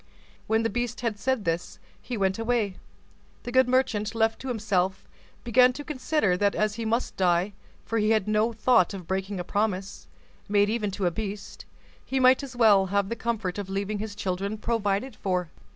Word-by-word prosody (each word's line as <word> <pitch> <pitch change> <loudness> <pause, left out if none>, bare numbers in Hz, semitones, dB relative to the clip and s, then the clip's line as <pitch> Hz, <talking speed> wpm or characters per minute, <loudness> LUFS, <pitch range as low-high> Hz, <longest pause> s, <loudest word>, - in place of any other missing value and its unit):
When 220 +1 +2
the 225 - +1
beast 240 +2 -3
had 225 -4 -2
said 260 -5 0
this, 165 +1 -2 0.2
he 245 - -5
went 190 0 0
away. 225 -4 0 0.7
The 245 - -5
good 260 0 +4
merchant, 230 -4 +1
left 225 0 +1
to 265 - -7
himself, 195 -5 -1 0.4
began 250 +2 +5
to 290 - -7
consider 285 - 0
that 200 +1 +1
as 215 0 +1
he 230 +1 -5
must 230 +3 -1
die—for 185 +5 -1
he 210 0 +2
had 215 -3 +2
no 215 +2 +2
thought 215 -4 +3
of 185 -3 -8
breaking 190 +2 -3
a - - -2
promise, 200 0 -2 0.4
made 205 0 +3
even 215 -3 -1
to 195 0 -3
a 175 - +2
beast—he 205 +6 -6
might 255 +1 +5
as 270 -3 -8
well 210 -5 +5
have 200 +1 0
the 230 - -2
comfort 220 -5 -2
of 195 -2 -5
leaving 200 +2 -2
his 210 -1 -5
children 195 +2 -2
provided 215 +2 -1
for. 180 -3 -2
210 Hz, 185 wpm, -26 LUFS, 195-235 Hz, 0.7 s, began